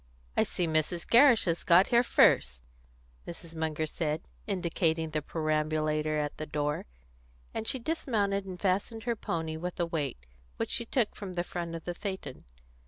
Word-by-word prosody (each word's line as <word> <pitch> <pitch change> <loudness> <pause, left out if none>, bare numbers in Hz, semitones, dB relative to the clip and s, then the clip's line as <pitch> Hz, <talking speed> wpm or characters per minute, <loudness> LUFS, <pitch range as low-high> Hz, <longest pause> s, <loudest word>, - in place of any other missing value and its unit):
"I - - +4
see 180 - 0
Mrs. 160 +2 0
Gerrish 240 -2 +6
has 170 -2 0
got 180 0 +6
here 235 0 +6
first," 65 - +4 0.6
Mrs. 170 -1 -9
Munger 160 -1 -1
said, 155 +1 -2 0.2
indicating 170 -4 0
the 155 0 -1
perambulator 155 0 0
at 150 -1 -2
the 155 - -5
door, 150 - -2 0.7
and 220 - -4
she - - +1
dismounted 220 -8 0
and 180 -1 -7
fastened 200 +4 0
her 235 -1 0
pony 160 -6 -3
with 180 +2 -5
a 175 - +2
weight, 145 - -3 0.3
which - - -2
she 235 - -1
took 235 -4 0
from 195 -3 -6
the 175 -1 -1
front 170 -1 -4
of 165 - -7
the 175 - -2
phaeton. 190 +1 -6
170 Hz, 170 wpm, -30 LUFS, 155-200 Hz, 0.7 s, Gerrish